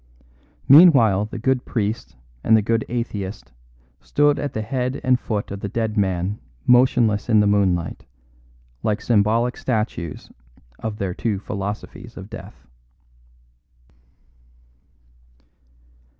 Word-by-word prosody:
Meanwhile 135 - +7
the 110 - -8
good 125 +2 0
priest 110 -1 -3 0.3
and 110 - +5
the 110 - +1
good 115 +1 +1
atheist 105 -5 -4 0.5
stood 145 0 +2
at 145 - -3
the 110 - -3
head 125 +3 -2
and 130 -1 +3
foot 105 -4 -3
of 100 - -5
the 100 - -5
dead 110 0 -2
man 95 -1 -1 0.3
motionless 120 -4 +3
in 110 -2 +5
the 105 - +4
moonlight, 95 -9 0 0.7
like 105 +6 0
symbolic 115 +2 +1
statues 105 - -3 0.5
of 110 -2 -4
their 95 -3 -3
two 110 +1 -2
philosophies 105 +4 -6
of 95 +3 -10
death. - - -11
110 Hz, 115 wpm, -22 LUFS, 100-120 Hz, 0.7 s, Meanwhile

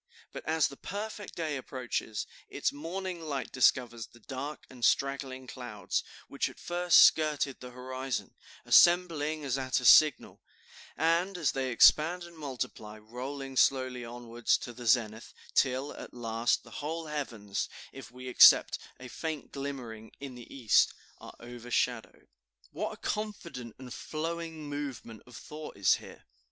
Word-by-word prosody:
But - - -8
as 160 -1 +3
the 140 - -11
perfect 205 0 -6
day 155 -4 -2
approaches, 125 -4 -4 0.2
its - - -1
morning 175 +4 -5
light 145 -5 -4
discovers 120 -3 +2
the 120 - -19
dark 135 +5 -6
and 125 -2 -13
straggling 135 0 +1
clouds, 120 -7 -4 0.2
which - - -1
at - - -14
first 175 0 +4
skirted 150 -3 +3
the 125 - -9
horizon, 130 0 -5 0.3
assembling 160 -4 +4
as 135 0 0
at 130 0 0
a 125 - -6
signal, 155 +4 +6 0.6
and 170 +4 +2
as 160 -5 +1
they 130 -1 -2
expand 160 +8 +5
and 170 0 -12
multiply, 125 -7 -6
rolling 130 +5 -7
slowly 130 -1 +2
onward 120 0 -10
to 120 - +2
the 120 0 -8
zenith, 110 -1 +1 0.2
till, 130 +2 +1
at - - -10
last, 115 0 0
the - - -15
whole 160 +3 -3
heavens, 115 -10 -4 0.2
if 135 -3 -10
we 125 +1 -10
except 125 - +7 0.2
a 125 - -9
faint 155 +3 -5
glimmering 125 -6 -6
in 135 -2 -7
the 120 -1 -12
East, 120 -6 +3 0.2
are - - -11
overshadowed." 120 0 -3 0.4
What - - -3
a - - -11
confident 170 - -5
and 125 -2 -9
flowing 160 -1 -5
movement 140 -6 -6
of 125 -3 -11
thought 155 -5 -9
is 100 -2 +4
here! - - -13
130 Hz, 145 wpm, -30 LUFS, 120-155 Hz, 0.6 s, except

